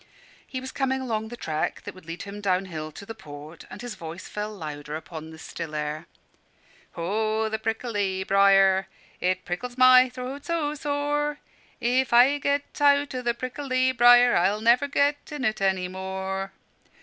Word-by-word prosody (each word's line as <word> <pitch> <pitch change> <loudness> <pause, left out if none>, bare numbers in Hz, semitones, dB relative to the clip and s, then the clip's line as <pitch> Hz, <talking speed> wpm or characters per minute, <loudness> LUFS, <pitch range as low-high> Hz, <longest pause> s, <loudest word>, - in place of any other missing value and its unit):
He 260 - -5
was 260 0 -7
coming 265 -1 0
along 220 -4 -2
the 240 +2 -9
track 155 -7 -3
that - - -7
would 185 -3 -16
lead 165 +2 -6
him 200 +1 -8
down 190 -1 +1
hill 155 -4 -6
to 200 +7 -11
the 225 - -7
port; 155 -5 -11
and 190 +5 -9
his 245 -2 -5
voice 165 +2 -8
fell 210 +1 -4
louder 150 -5 -6
on 160 -1 -7
the 160 - -11
still 160 -1 -7
air 150 +2 -4 0.9
"Ho! 215 +5 -1
the 220 0 -2
prickly 215 -4 -2
briar, 195 0 +4 0.3
It 185 0 -1
prickles 245 +8 -5
my 255 0 +7
throat 255 +3 -7
so 320 -3 -1
sore 295 0 -1 0.4
If 250 +1 +1
I 260 +4 +6
get 285 +1 -2
out 285 -1 +4
o' 255 - -3
the 240 -1 0
prickly 255 +1 -1
briar, 245 0 +6
I'll 195 +4 +2
never 240 +5 +4
get 285 +1 0
in 290 -3 -3
any 190 -4 +1
more." 190 +1 -4
220 Hz, 170 wpm, -26 LUFS, 185-255 Hz, 0.9 s, my